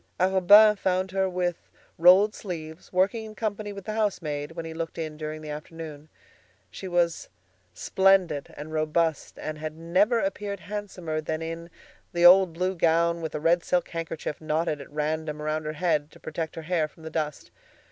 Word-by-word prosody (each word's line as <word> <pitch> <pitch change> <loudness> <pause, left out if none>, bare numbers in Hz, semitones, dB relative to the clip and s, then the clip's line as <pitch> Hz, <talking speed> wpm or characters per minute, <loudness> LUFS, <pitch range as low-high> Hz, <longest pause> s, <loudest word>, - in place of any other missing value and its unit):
Arobin 190 +3 +7
found 185 0 0
her 190 0 +1
with 180 -1 -3 0.3
rolled 185 +5 +7
sleeves, 160 -4 -7
working 195 +5 +1
in 215 -1 -10
company 210 -1 -3
with 200 -1 -9
the 215 - -3
house 215 -2 0
maid 150 -1 -4
when 165 -1 -6
he 160 - -6
looked 165 0 -5
in 155 -2 -4
during 155 0 -6
the 155 -1 -7
afternoon. 155 0 -8 0.6
She 190 - -7
was 175 -2 0 0.5
splendid 190 - +2
and 155 +2 -7
robust, 155 0 0
and 155 0 -5
had 155 0 -5
never 190 +8 +2
appeared 200 0 -3
handsomer 185 -6 -4
than 155 +1 -3
in 165 +1 -6 0.4
the 175 0 +3
old 185 0 +8
blue 185 +3 -1
gown, 170 0 +2
with 160 -2 -4
a - - -1
red 170 +3 +3
silk 180 -1 0
handkerchief 165 -2 -5
knotted 155 -1 -1
at - - -11
random 155 0 -2
around 155 +1 -2
her 155 - -3
head 155 -2 0
to - - -17
protect 160 0 -5
her 165 - -6
hair 160 -1 0
from 160 - -19
the 160 - -7
dust. 150 -2 -3
165 Hz, 180 wpm, -26 LUFS, 155-185 Hz, 0.6 s, old